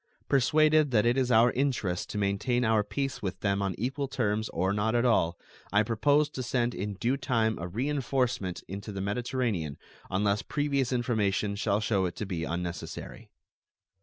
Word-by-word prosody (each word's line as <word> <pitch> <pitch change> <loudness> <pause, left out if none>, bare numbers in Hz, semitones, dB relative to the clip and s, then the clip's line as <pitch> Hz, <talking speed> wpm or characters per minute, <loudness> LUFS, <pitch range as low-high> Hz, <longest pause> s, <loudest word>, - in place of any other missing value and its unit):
Persuaded 155 +3 +4
that 115 -4 +3
it 120 +1 +3
is 130 -2 +1
our 120 +1 +6
interest 120 -10 -1
to - - -4
maintain 105 +5 +1
our 110 -1 +3
peace 135 +5 -3
with 95 -3 -4
them 100 -1 +1
on 95 -3 -1
equal 135 +5 -2
terms 110 -5 -1
or 95 +4 0
not 110 +3 0
at 120 +1 +2
all, 85 -8 +2 0.3
I 105 +2 +4
propose 145 +7 +2
to 130 - -5
send 120 0 0
in 100 +1 -4
due 120 +7 0
time 115 -4 0
a 85 - -4
reenforcement 125 -3 -1
into 100 +2 -6
the 100 - -5
Mediterranean 100 - -2 0.3
unless 100 +2 +1
previous 140 -3 -1
information 105 -5 0
shall 100 0 0
show 100 -3 +1
it 90 - -3
to 105 - -4
be 85 -4 -3
unnecessary. 85 +1 -5
110 Hz, 170 wpm, -29 LUFS, 100-130 Hz, 0.3 s, our